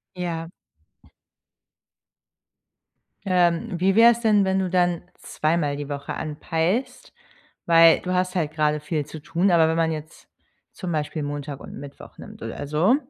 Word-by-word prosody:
Ja. 165 Hz, -2 st, -4 dB, 2.8 s
Ähm, 180 Hz, +1 st, +1 dB
wie 190 Hz, +2 st, +2 dB
wäre 230 Hz, +2 st, +8 dB
es 235 Hz, -, -2 dB
denn, 210 Hz, -3 st, +4 dB
wenn 190 Hz, 0 st, +1 dB
du 190 Hz, -1 st, -1 dB
dann 175 Hz, -1 st, +1 dB, 0.2 s
zweimal 155 Hz, -2 st, -1 dB
die 145 Hz, 0 st, -6 dB
Woche 140 Hz, -1 st, -5 dB
anpeilst? 165 Hz, -, -2 dB, 0.5 s
Weil 165 Hz, -1 st, +6 dB
du 185 Hz, -, -3 dB
hast 180 Hz, 0 st, 0 dB
halt 160 Hz, -5 st, 0 dB
grade 150 Hz, -1 st, +1 dB
viel 150 Hz, 0 st, -3 dB
zu 155 Hz, -, -9 dB
tun, 170 Hz, +5 st, 0 dB
aber 165 Hz, -2 st, +5 dB
wenn 160 Hz, -, 0 dB
man 165 Hz, -1 st, +1 dB
jetzt 155 Hz, 0 st, -8 dB, 0.4 s
zum 185 Hz, -4 st, -6 dB
Beispiel 155 Hz, 0 st, -2 dB
Montag 145 Hz, -1 st, -5 dB
und -, -, -11 dB
Mittwoch 140 Hz, 0 st, -12 dB
nimmt -, -, -12 dB
oder 145 Hz, -, -6 dB
so, 160 Hz, -, +3 dB
165 Hz, 150 wpm, -23 LUFS, 150-185 Hz, 2.8 s, wäre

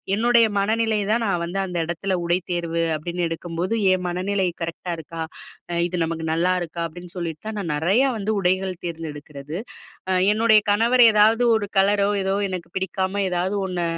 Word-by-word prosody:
என்னுடைய 235 Hz, +1 st, +4 dB
மனநிலை 220 Hz, +1 st, +1 dB
தான் 230 Hz, +1 st, +2 dB
நான் 180 Hz, -3 st, 0 dB
வந்து 190 Hz, +3 st, -3 dB
அந்த 180 Hz, -2 st, -4 dB
இடத்துல 185 Hz, +3 st, -2 dB
உடைத்தேர்வு 170 Hz, -1 st, -1 dB
அப்பிடின்னு 175 Hz, +3 st, -3 dB
எடுக்கும்போது, 170 Hz, +4 st, -3 dB, 0.2 s
என் 185 Hz, -1 st, -1 dB
மனநிலை 190 Hz, +1 st, 0 dB, 0.2 s
கரெக்ட்டா 170 Hz, +1 st, -4 dB
இருக்கா? 165 Hz, +1 st, -7 dB, 0.7 s
இது 180 Hz, -, -3 dB
நமக்கு 160 Hz, 0 st, -4 dB
நல்லா 180 Hz, +3 st, +2 dB
இருக்கா? 170 Hz, 0 st, -5 dB
அப்டீன்னு 175 Hz, +2 st, -12 dB
சொல்லிட்டு 165 Hz, -3 st, -5 dB
தான் 220 Hz, -, -4 dB
நான் 170 Hz, -5 st, -3 dB
நெறையா 195 Hz, -, +2 dB
வந்து 210 Hz, +1 st, -1 dB
உடைகள் 185 Hz, 0 st, 0 dB
தேர்ந்தெடுக்கிறது. 150 Hz, -2 st, -6 dB, 0.5 s
அ -, -, +3 dB, 0.2 s
என்னுடைய 220 Hz, -1 st, +5 dB
கணவர் 235 Hz, +4 st, +4 dB
ஏதாவது 220 Hz, +3 st, +4 dB
ஒரு 210 Hz, -2 st, -2 dB
கலரோ 200 Hz, +1 st, +3 dB
ஏதோ 195 Hz, +1 st, 0 dB, 0.2 s
எனக்கு 175 Hz, -2 st, -5 dB
பிடிக்காம 190 Hz, +1 st, -1 dB
ஏதாவது 180 Hz, +2 st, -1 dB
ஒண்ணு 180 Hz, -2 st, -2 dB
185 Hz, 160 wpm, -23 LUFS, 170-205 Hz, 0.7 s, என்னுடைய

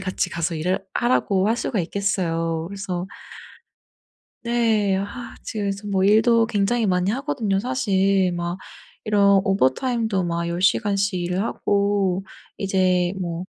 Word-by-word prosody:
같이 185 Hz, -1 st, -2 dB
가서 165 Hz, 0 st, -2 dB
일을 185 Hz, +5 st, -1 dB
하라고 205 Hz, -5 st, +1 dB
할 230 Hz, -, +1 dB
수가 215 Hz, -5 st, -1 dB
있겠어요. 165 Hz, -3 st, -1 dB
그래서 190 Hz, -2 st, -4 dB, 1.4 s
네 225 Hz, -4 st, +1 dB
아 205 Hz, +5 st, -6 dB
지금 210 Hz, -2 st, -4 dB
그래서 200 Hz, +1 st, -3 dB
뭐 190 Hz, -1 st, +1 dB
일도 225 Hz, +3 st, +4 dB
굉장히 220 Hz, +2 st, +1 dB
많이 180 Hz, +2 st, +1 dB
하거든요. 225 Hz, -6 st, -1 dB
사실 195 Hz, -6 st, +1 dB
막 175 Hz, +1 st, -3 dB, 0.5 s
이런 200 Hz, -2 st, +4 dB
오버타임도 200 Hz, -, +1 dB
막 170 Hz, 0 st, -2 dB
10 170 Hz, +1 st, -3 dB
시간씩 200 Hz, -1 st, +1 dB
일을 180 Hz, +3 st, -1 dB
하고 200 Hz, -4 st, 0 dB, 0.3 s
이제 185 Hz, -2 st, +1 dB
뭐 170 Hz, 0 st, -4 dB
195 Hz, 260 characters per minute, -22 LUFS, 180-210 Hz, 1.4 s, 일도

